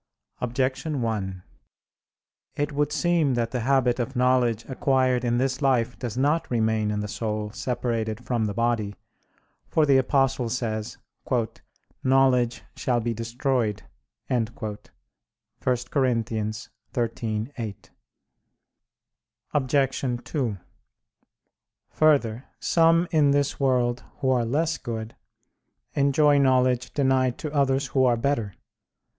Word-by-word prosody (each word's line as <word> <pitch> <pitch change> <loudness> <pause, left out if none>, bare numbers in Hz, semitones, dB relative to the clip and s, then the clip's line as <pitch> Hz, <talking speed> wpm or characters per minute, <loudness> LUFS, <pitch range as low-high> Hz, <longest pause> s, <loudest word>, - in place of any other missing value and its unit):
Objection 130 +3 -1
1: 95 -5 -3 1.1
It 145 +1 -1
would 145 0 0
seem 165 -6 +2
that 115 -1 -1
the 125 - -1
habit 125 0 +2
of 120 +3 -3
knowledge 125 -3 +2
acquired 130 -2 +1
in 120 0 +1
this 130 +1 0
life 125 -3 +2
does 120 -2 -4
not 150 +5 +1
remain 110 -2 +1
in 105 0 -1
the 105 - -3
soul 105 0 -3
separated 120 -2 -2
from 120 -3 0
the 105 - -2
body: 115 -3 0 0.7
for 155 - +2
the 140 -2 +5
Apostle 135 -2 +1
says: 110 -2 -3 1.1
"Knowledge 130 -2 +3
shall 120 -2 0
be 120 0 -1
destroyed" 115 -1 -1 0.4
(1 120 -4 +1
Cor. 105 -2 -5 0.8
13:8). 115 -2 -2 1.6
Obj. 135 -3 0
2: 125 -10 -2 1.3
Further, 135 -6 +2
some 165 +1 +3
in 150 -3 +4
this 140 0 +1
world 125 -3 +1
who 130 - +1
are 120 -2 +2
less 155 +6 0
good 110 -2 -5 0.8
enjoy 145 +1 +4
knowledge 130 -2 +2
denied 130 -3 +2
to 150 -1 -5
others 140 -1 +2
who 130 - +4
are 120 -2 +3
better. 115 -5 -1
125 Hz, 110 wpm, -25 LUFS, 115-135 Hz, 1.6 s, the